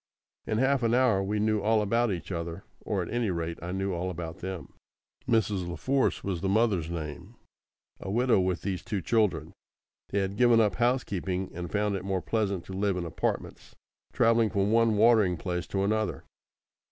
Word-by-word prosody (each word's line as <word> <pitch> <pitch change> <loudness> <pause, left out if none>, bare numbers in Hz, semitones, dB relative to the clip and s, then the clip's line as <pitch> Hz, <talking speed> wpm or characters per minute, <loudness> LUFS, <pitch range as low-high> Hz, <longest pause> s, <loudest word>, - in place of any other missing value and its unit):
In 110 - 0
half 130 +2 +2
an 115 0 +2
hour 125 -6 +3
we 100 +2 -1
knew 110 0 +1
all 110 +2 +3
about 115 +2 +1
each 90 0 -5
other, 85 -1 -4 0.2
or - - -1
at - - -7
any 120 -3 0
rate 85 -2 -3
I 85 +1 -5
knew 95 0 -2
all 90 +2 -2
about 85 -2 -6
them. 95 -2 -6 0.6
Mrs. 100 -5 +1
La 85 - -4
Force 135 +5 0
was 95 -4 -2
the 95 - 0
mother's 100 -6 +2
name, 75 -4 -6 0.6
a - - -6
widow 120 +1 +3
with 90 -1 -1
these 95 -3 -2
two 105 - -3
children. 110 -2 +1 0.6
They - - -2
had 100 0 -1
given 120 -1 +5
up 105 -2 +2
housekeeping, 95 -7 -1
and 85 -1 -6
found 105 -1 0
it 95 - -4
more 95 -1 -1
pleasant 100 -1 -1
to 95 - -8
live 100 0 0
in 90 - -3
apartments, 80 - -4 0.4
travelling 115 -1 +3
from 100 0 0
one 115 -1 +3
watering 105 -5 +4
place 90 0 -3
to 95 0 -1
another. 110 +1 -1
100 Hz, 190 wpm, -28 LUFS, 90-110 Hz, 0.6 s, given